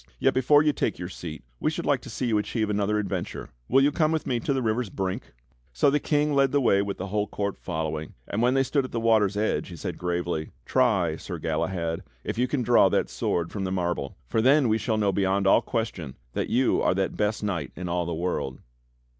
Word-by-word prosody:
Yet - - +2
before 145 +3 +5
you 150 -1 +3
take - - -1
your 90 - -5
seat 80 -6 -8 0.2
we - - +1
should - - -4
like - - +2
to - - -10
see - - -3
you 110 -3 +2
achieve 110 0 -1
another 105 +1 +1
adventure. 100 -4 -3 0.2
Will 135 +2 +4
you 145 - +4
come 155 +1 +2
with 160 -1 -1
me 120 -2 0
to 130 - -2
the 135 -2 0
river's 110 0 0
brink?" 95 -1 -4 0.4
So 60 - +3
the 150 - +2
King 150 0 +1
led 135 -1 +3
the 145 - +3
way 100 -7 +3
with 100 0 -3
the 95 +2 -5
whole 105 +1 0
court 100 -1 -3
following, 80 -3 -4
and 105 - -2
when 125 +2 +3
they 135 - +4
stood 135 +2 +1
at 130 - -8
the 115 - 0
water's 110 -3 +3
edge, 110 +1 0
he 90 - -8
said 80 - -5
gravely: 85 -2 -2 0.2
"Try, - - +2
Sir - - -6
Galahad, 85 -3 -2 0.2
if - - -3
you 125 - +3
can 130 -1 -1
draw 120 0 +5
that - - 0
sword 85 -1 -1
from 100 - -3
the 95 - -2
marble, 85 -7 -2
for 110 - 0
then 135 +2 +5
we 110 +1 +2
shall 110 +1 0
know 105 -2 +2
beyond 95 +1 +1
all 95 - +5
question 100 - -3 0.2
that - - -2
you 130 +1 +2
are - - +2
that 95 0 -1
best 105 0 -1
knight 85 -10 -2
in 90 - -5
all 85 0 -1
the - - -2
world." 80 -6 -2
105 Hz, 240 wpm, -26 LUFS, 90-125 Hz, 0.4 s, before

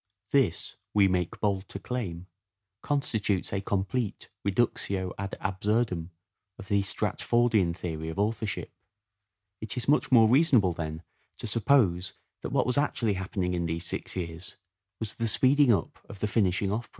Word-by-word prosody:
This, - - +1 0.2
we 100 -2 +6
make 90 -2 -1
bold 100 -2 -1
to - - -6
claim, 100 -7 -4 0.6
constitutes 110 -11 0
a 100 - 0
complete 100 +3 -2
reductio 100 -3 0
ad 100 -1 -4
absurdum 95 -2 0 0.5
of 95 - -11
the 100 -1 +3
Stratfordian 105 -2 +1
theory 80 -3 -4
of 80 - -6
authorship. 105 0 -1
A - - -43
rational 100 -1 -54
It 110 +3 -4
is 125 - -3
much 145 0 +3
more 115 -3 +7
reasonable, 125 - +4
then, 80 0 -5 0.3
to - - -7
suppose 105 -5 +2 0.3
that - - -4
performance. - - +2
wjiat - - -11
was 125 +3 0
actually 115 -7 +1
happening 95 -1 -2
in 85 -1 -1
these 85 +1 -3
six - - -3
years, 85 -1 -6 0.4
was 110 -2 -3
the 115 - -2
speeding 135 +4 +4
up 95 -8 0
of 100 - -9
the 105 - 0
finishing 100 -2 +1
of! 115 +3 -3
100 Hz, 160 wpm, -28 LUFS, 90-115 Hz, 0.6 s, more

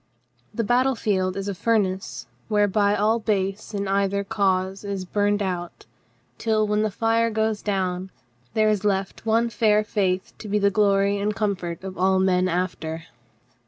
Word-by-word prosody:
The 230 - -2
battle 250 +4 +2
field 190 -4 0
is 195 0 -3
a 200 - -1
furnace 190 - -1 0.2
whereby 205 -1 +2
all 215 +3 +2
base 200 -1 -1
in 200 0 -2
either 200 0 +1
cause 190 -1 0
is 200 -2 -4
burned 205 +2 +1
out 175 -2 -4 0.5
till, 215 -1 +1
when 210 0 +1
the 215 - +1
fire 225 +2 +1
dies 220 -1 -1
down, 190 -2 -2 0.5
there 215 -1 +3
is 210 -2 0
left 195 +1 -1
one 230 +2 +3
fair 210 -1 +3
faith 190 -4 -1
to 215 - -8
be 210 +1 +1
the 200 -1 +3
glory 200 -1 +2
and 210 +1 -1
comfort 190 -5 -2
of 190 -1 -7
all 190 +1 +3
men 185 -1 +2
after. 165 -2 -2
200 Hz, 160 wpm, -24 LUFS, 190-215 Hz, 0.5 s, there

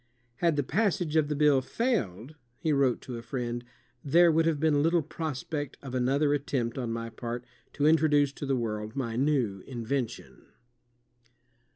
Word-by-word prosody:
"Had 170 -3 +2
the 145 - +1
passage 180 -1 0
of 155 -2 +4
the 150 - -1
bill 145 -2 +4
failed," 130 - -2 0.2
he 155 - 0
wrote 135 -3 +2
to 125 -2 -6
a - - -6
friend, 120 0 -4 0.4
''there 170 +4 +5
would 165 +1 +3
have 160 -3 +1
been 150 -2 +3
little 165 +1 +3
pros 155 -3 -4
pect 145 -3 -4
of 135 -2 -7
another 135 +4 +2
attempt 130 -5 -1
on 125 -3 -3
my 115 0 -4
part 120 +2 -5 0.3
to 145 - 0
introduce 150 -3 +4
to 145 - -6
the 135 - +2
world 110 -2 -3
my 120 -5 -2
new 125 -7 +1
invention." 125 0 -4
140 Hz, 170 wpm, -29 LUFS, 120-155 Hz, 0.4 s, there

